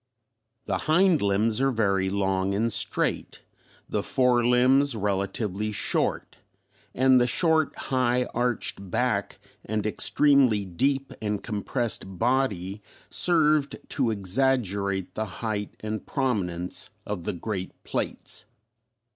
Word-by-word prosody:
The -, -, -1 dB
hind 175 Hz, -1 st, +4 dB
limbs 105 Hz, +4 st, +1 dB
are 135 Hz, -, +3 dB
very 100 Hz, -6 st, +1 dB
long 95 Hz, 0 st, 0 dB
and 115 Hz, +2 st, +1 dB
straight, -, -, -1 dB, 0.4 s
the -, -, -1 dB
fore 125 Hz, -2 st, +2 dB
limbs 130 Hz, +3 st, +4 dB
relatively 100 Hz, 0 st, -2 dB
short, 105 Hz, -, -1 dB, 0.6 s
and 130 Hz, 0 st, +5 dB
the 120 Hz, -, +3 dB
short 160 Hz, +3 st, +2 dB
high 125 Hz, -1 st, 0 dB
arched 120 Hz, -5 st, -2 dB
back -, -, -1 dB, 0.3 s
and 105 Hz, 0 st, -2 dB
extremely 125 Hz, -1 st, +3 dB
deep 135 Hz, +9 st, -1 dB
and 105 Hz, -2 st, -2 dB
compressed 105 Hz, -3 st, -2 dB
body 105 Hz, -5 st, 0 dB, 0.3 s
served 155 Hz, -4 st, +2 dB
to 130 Hz, -5 st, 0 dB
exaggerate 100 Hz, -3 st, 0 dB
the 110 Hz, -, -2 dB, 0.2 s
height 105 Hz, -2 st, -3 dB
and 110 Hz, 0 st, -4 dB
prominence 95 Hz, -, -2 dB, 0.2 s
of 100 Hz, -5 st, -5 dB
the -, -, -1 dB
great 95 Hz, +1 st, -4 dB
plates. -, -, -4 dB
110 Hz, 115 wpm, -26 LUFS, 100-130 Hz, 0.6 s, and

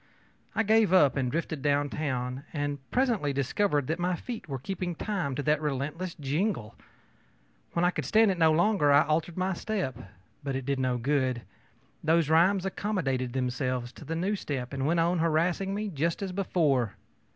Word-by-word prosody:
I 225 Hz, -, +2 dB
gave 220 Hz, -2 st, +4 dB
up 145 Hz, -7 st, +5 dB
and 130 Hz, -3 st, 0 dB
drifted 160 Hz, -2 st, -2 dB
down 145 Hz, 0 st, +1 dB
town, 130 Hz, -3 st, -3 dB
and 145 Hz, -2 st, -2 dB
presently 235 Hz, -, +1 dB
discovered 145 Hz, +2 st, +1 dB
that 160 Hz, +5 st, -2 dB
my 180 Hz, +1 st, +1 dB
feet 225 Hz, -1 st, -7 dB
were 135 Hz, -, -2 dB
keeping 175 Hz, +5 st, -4 dB
time 180 Hz, -9 st, -2 dB
to 145 Hz, -, -2 dB
that 150 Hz, +1 st, +2 dB
relentless 150 Hz, +5 st, -3 dB
jingle. 145 Hz, -, -1 dB, 1.0 s
When 170 Hz, +1 st, +2 dB
I 175 Hz, -, +4 dB
could -, -, -4 dB
stand 220 Hz, -1 st, +4 dB
it 180 Hz, -, -3 dB
no 160 Hz, -1 st, +5 dB
longer 170 Hz, -2 st, +3 dB
I 140 Hz, +1 st, +6 dB
altered 155 Hz, +3 st, -1 dB
my 185 Hz, +1 st, 0 dB
step. 185 Hz, -, -2 dB, 0.5 s
But 135 Hz, -1 st, -2 dB
it 135 Hz, -1 st, -3 dB
did 140 Hz, 0 st, -1 dB
no 130 Hz, -1 st, +1 dB
good; 130 Hz, -1 st, 0 dB, 0.6 s
those 160 Hz, -1 st, +3 dB
rhymes 185 Hz, +4 st, +4 dB
accommodated 145 Hz, -, -1 dB
themselves 125 Hz, -1 st, -2 dB
to -, -, -12 dB
the 165 Hz, -, -4 dB
new 190 Hz, +5 st, 0 dB
step 135 Hz, -8 st, -4 dB
and 135 Hz, 0 st, -1 dB
went 170 Hz, +2 st, +2 dB
on 170 Hz, +1 st, +2 dB
harassing 170 Hz, +4 st, +1 dB
me 210 Hz, 0 st, -2 dB
just 165 Hz, +3 st, -1 dB
as 190 Hz, -, -3 dB
before. 155 Hz, -, +1 dB
155 Hz, 180 wpm, -28 LUFS, 135-185 Hz, 1.0 s, I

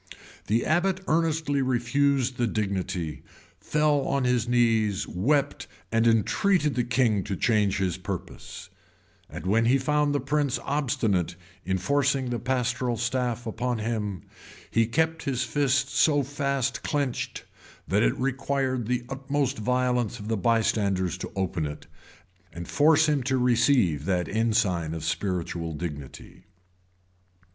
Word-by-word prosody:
The 115 Hz, +3 st, +1 dB
abbot 180 Hz, +4 st, +1 dB
earnestly 160 Hz, -3 st, +1 dB
refused 130 Hz, +1 st, +1 dB
the 120 Hz, -, +1 dB
dignity, 95 Hz, -, -3 dB, 0.4 s
fell 150 Hz, -1 st, +2 dB
on 140 Hz, -1 st, 0 dB
his 125 Hz, -2 st, +1 dB
knees, 115 Hz, -4 st, +2 dB
wept, 140 Hz, +10 st, 0 dB, 0.2 s
and 115 Hz, +1 st, +3 dB
entreated 150 Hz, -, +2 dB
the 125 Hz, -, 0 dB
king 120 Hz, -4 st, +1 dB
to 100 Hz, -2 st, -3 dB
change 105 Hz, -2 st, +2 dB
his 95 Hz, -3 st, -1 dB
purpose,[] -, -, -7 dB, 0.6 s
and 85 Hz, +2 st, -8 dB
when 110 Hz, +5 st, +2 dB
he 125 Hz, +4 st, +4 dB
found 145 Hz, +2 st, +1 dB
the -, -, +2 dB
prince 140 Hz, 0 st, 0 dB
obstinate 110 Hz, -, 0 dB, 0.3 s
in 95 Hz, 0 st, 0 dB
forcing 135 Hz, +5 st, +1 dB
the 120 Hz, -, -1 dB
pastoral 125 Hz, 0 st, -1 dB
staff 120 Hz, 0 st, -1 dB
upon 120 Hz, +2 st, -2 dB
him, 105 Hz, -5 st, -3 dB, 0.5 s
he 115 Hz, -1 st, +2 dB
kept 160 Hz, +6 st, 0 dB
his 130 Hz, -3 st, 0 dB
fist 135 Hz, +2 st, +1 dB
so 145 Hz, -3 st, +4 dB
fast 140 Hz, -1 st, -2 dB
clinched, 145 Hz, -5 st, -2 dB, 0.4 s
that -, -, +2 dB
it -, -, +2 dB
required 135 Hz, -2 st, -1 dB
the 125 Hz, 0 st, -1 dB
utmost 135 Hz, -1 st, -2 dB
violence 125 Hz, 0 st, 0 dB
of 105 Hz, +1 st, -7 dB
the 115 Hz, -, +1 dB
bystanders 100 Hz, -4 st, +1 dB
to -, -, -6 dB
open 90 Hz, -5 st, -1 dB
it, 75 Hz, -, -8 dB, 0.7 s
and 85 Hz, +1 st, -8 dB
force 155 Hz, +1 st, +4 dB
him 150 Hz, -2 st, +1 dB
to 130 Hz, +1 st, 0 dB
receive 120 Hz, -, +2 dB
that 90 Hz, -3 st, 0 dB
ensign 105 Hz, -7 st, 0 dB
of 80 Hz, -, -6 dB
spiritual 85 Hz, -1 st, -2 dB
dignity. 75 Hz, -3 st, -8 dB
120 Hz, 135 wpm, -26 LUFS, 100-140 Hz, 0.7 s, he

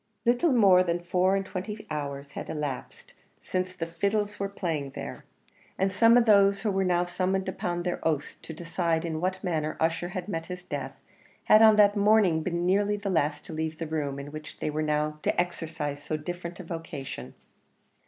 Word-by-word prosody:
Little 245 Hz, +7 st, +3 dB
more 195 Hz, -7 st, +6 dB
than 175 Hz, -1 st, 0 dB
four 180 Hz, +2 st, +2 dB
and 195 Hz, 0 st, -1 dB
twenty 210 Hz, +3 st, -6 dB
hours 140 Hz, -1 st, -4 dB
had -, -, -7 dB
elapsed 145 Hz, -4 st, -5 dB, 0.3 s
since 185 Hz, 0 st, -3 dB
the 165 Hz, -, -3 dB
fiddles 200 Hz, +5 st, -1 dB
were 200 Hz, 0 st, -1 dB
playing 165 Hz, -8 st, -3 dB
there, -, -, -7 dB, 0.5 s
and 190 Hz, +1 st, +1 dB
some 230 Hz, +5 st, +6 dB
of 240 Hz, -, +4 dB
those 200 Hz, -2 st, +5 dB
who 215 Hz, -, 0 dB
were 195 Hz, 0 st, +1 dB
now 180 Hz, -1 st, +2 dB
summoned 185 Hz, +2 st, -1 dB
upon 175 Hz, -1 st, -2 dB
their 180 Hz, 0 st, -2 dB
oaths 150 Hz, -3 st, -1 dB
to -, -, -8 dB
decide 165 Hz, 0 st, -1 dB
in 160 Hz, -1 st, -3 dB
what 185 Hz, +1 st, -2 dB
manner 155 Hz, -4 st, -1 dB
Ussher 165 Hz, +2 st, 0 dB
had 185 Hz, -2 st, -5 dB
met 165 Hz, -5 st, -4 dB
his 180 Hz, -1 st, -7 dB
death, -, -, -5 dB, 0.5 s
had 215 Hz, -, +6 dB
on 220 Hz, -1 st, +8 dB
that 205 Hz, 0 st, +5 dB
morning 205 Hz, -5 st, +4 dB
been 170 Hz, +1 st, -2 dB
nearly 205 Hz, +3 st, +2 dB
the 200 Hz, -1 st, -3 dB
last 150 Hz, -3 st, 0 dB
to -, -, -8 dB
leave 160 Hz, 0 st, -3 dB
the 165 Hz, -, -4 dB
room 150 Hz, -3 st, -2 dB
in 140 Hz, +1 st, -7 dB
which 155 Hz, 0 st, -9 dB
they 155 Hz, -, -2 dB
were 155 Hz, +1 st, -2 dB
now 150 Hz, 0 st, 0 dB
to -, -, 0 dB
exercise 160 Hz, -5 st, -3 dB
so 155 Hz, +1 st, -3 dB
different 175 Hz, +3 st, -6 dB
a -, -, -6 dB
vocation. 145 Hz, -, -7 dB
175 Hz, 195 wpm, -28 LUFS, 155-195 Hz, 0.5 s, on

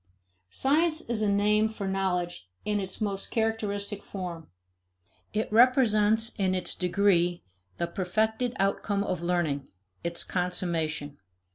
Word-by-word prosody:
Science 310 Hz, -, +2 dB
is 220 Hz, -2 st, 0 dB
a 210 Hz, -1 st, +2 dB
name 210 Hz, +2 st, +3 dB
for 215 Hz, -3 st, -5 dB
knowledge 180 Hz, -, -1 dB, 0.2 s
in 210 Hz, -1 st, +1 dB
its 190 Hz, -1 st, -5 dB
most 200 Hz, -2 st, -2 dB
characteristic 210 Hz, -2 st, -1 dB
form. 175 Hz, -6 st, -6 dB, 0.8 s
It 215 Hz, +1 st, -1 dB
represents 225 Hz, -3 st, +4 dB
in 190 Hz, -1 st, +2 dB
its 185 Hz, -, -2 dB
degree, 175 Hz, -1 st, +2 dB, 0.3 s
the -, -, 0 dB
perfected 220 Hz, +7 st, -1 dB
outcome 200 Hz, +1 st, 0 dB
of 180 Hz, -4 st, -2 dB
learning, 170 Hz, -6 st, 0 dB, 0.4 s
its 170 Hz, 0 st, -1 dB
consummation. 170 Hz, -5 st, -1 dB
200 Hz, 120 wpm, -28 LUFS, 175-215 Hz, 0.8 s, represents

